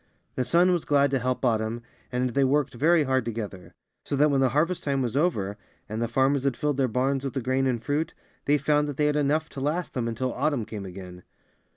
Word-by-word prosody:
'^ - - -40 0.3
The 130 - -1
sun 175 +7 +4
was 175 -3 +1
glad 140 -1 +3
to 135 - +1
help 130 +2 -1
Autumn, 115 0 0 0.3
and 125 0 0
they 140 +2 +2
worked 140 +1 +1
very 155 +6 +3
hard 130 -2 +1
together; 105 -5 -6 0.3
so - - -2
that 150 +2 +4
when 135 -1 +2
the 130 - +4
harvest 165 +8 0
time 135 -2 0
was 120 0 -3
over, 105 - 0 0.3
and 110 +2 -4
the 115 - +1
farmers 135 +3 +2
had 135 -3 0
filled 150 -2 -1
their 135 -2 +2
barns 130 +3 0
with 135 - -3
the - - +1
grain 130 +2 +1
and 120 -3 -1
fruit, 155 +4 -1 0.3
they 145 +1 +4
found 150 +1 +1
that 140 - -6
they 150 - +2
had 150 0 +2
enough 150 +2 +1
to 135 - -7
last 160 +6 -2
them 120 -3 -2
until 120 +2 -2
Autumn 140 -4 0
came 105 -3 -7
again. 90 -1 -9
135 Hz, 240 wpm, -26 LUFS, 120-145 Hz, 0.3 s, sun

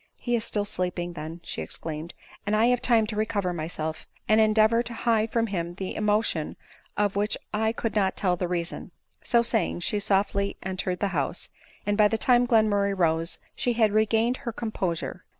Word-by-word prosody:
" - - -33
He 240 -1 0
is 225 - -1
still 205 -3 -1
sleeping 180 -2 -3
then," 160 +1 -7
she - - -4
exclaimed, 155 - -5
" - - -22
and 210 - +2
I 220 +2 +4
have 245 -1 +2
time 230 -3 +4
to 215 - -5
recover 205 -4 -1
myself, 160 -1 -4 0.2
and 215 +1 +5
endeavor 220 +1 +4
to 240 0 -5
hide 225 -1 +1
from 230 -1 +1
him 175 -5 -3
the 190 0 -4
emotion 210 -6 +1 0.4
of 205 -1 +1
which 205 +1 +1 0.2
I 220 +1 +1
could 230 -1 -3
not 195 -3 +1
tell 180 -3 +2
the 180 0 -2
reason." 175 -1 -3 0.3
So 235 -1 +3
saying, 220 -7 0
she 210 +4 +1
softly 200 0 +1
entered 185 -1 -3
the 200 - +1
house, 165 -1 -2 0.3
and 205 +1 0
by 210 - +7
the 225 - 0
time 245 +1 +4
Glenmurray 205 -4 +2
rose 165 -1 +1 0.2
she 245 - 0
had 220 -2 +3
regained 220 +3 +2
her 245 -4 -5
composure. 205 -7 -3
205 Hz, 195 wpm, -26 LUFS, 180-220 Hz, 0.4 s, by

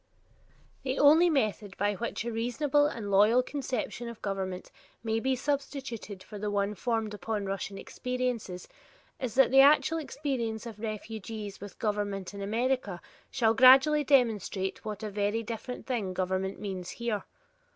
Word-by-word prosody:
The 265 0 -2
only 315 +5 +6
method 215 - -1
by 205 +1 +1
which 230 +2 -4
a 235 - -2
reasonable 275 +6 +1
and 220 -8 -5
loyal 215 +6 +5
conception 255 -3 -4
of 235 - -9
government 190 -2 -4 0.3
may 225 0 0
be 260 +3 +1
substituted 260 -7 -4
for 210 +1 -9
the 210 +1 -2
one 205 0 0
formed 225 -1 -2
upon 210 -1 -3
Russian 195 0 -4
experiences 250 -9 -3 0.5
is 250 -3 -4
that 265 -2 +5
the 270 0 +8
actual 300 +3 +5
experience 255 -7 -3
of 225 -3 -8
refugees 215 -2 -6
with 205 -2 -9
government 205 -3 -2
in 200 - -7
America 225 -2 -1 0.3
shall 225 -4 +2
gradually 265 +5 +7
demonstrate 220 -8 +1
what 215 0 -5
a 210 - -4
very 205 +3 0
different 230 +3 -6
thing 210 -8 -2
government 190 +1 -1
means 190 -3 -5
here. 230 -4 -2
225 Hz, 150 wpm, -29 LUFS, 205-255 Hz, 0.5 s, the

